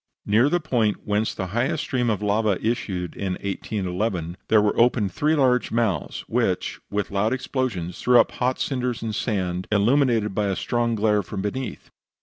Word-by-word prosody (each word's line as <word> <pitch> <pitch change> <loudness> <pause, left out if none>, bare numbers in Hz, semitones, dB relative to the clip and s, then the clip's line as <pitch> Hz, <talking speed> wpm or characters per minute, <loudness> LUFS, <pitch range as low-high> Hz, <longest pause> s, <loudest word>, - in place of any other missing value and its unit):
Near 115 +7 +4
the 175 - +2
point 120 -9 0
whence 105 +1 0
the 95 - -3
highest 120 +3 0
stream 125 -2 0
of 105 -1 -1
lava 105 -1 +2
issued 95 -7 -2
in 95 -2 -2
1811, 95 -2 -3
there 110 - +5
were 105 0 +2
opened 115 -4 +3
three 155 +2 +2
large 130 -4 +2
mouths, 115 -5 -1
which, - - -1
with 105 0 -2
loud 105 +4 +1
explosions, 125 -9 -3
threw 125 -1 +5
up - - +3
hot 125 +1 -1
cinders 125 -4 -2
and 110 -1 -3
sand, 95 -5 -2
illuminated 115 0 +3
by 105 +1 0
a 95 - 0
strong 120 +2 0
glare 105 -1 +2
from 95 +1 -5
beneath. 130 +6 -5
110 Hz, 170 wpm, -24 LUFS, 100-125 Hz, -, there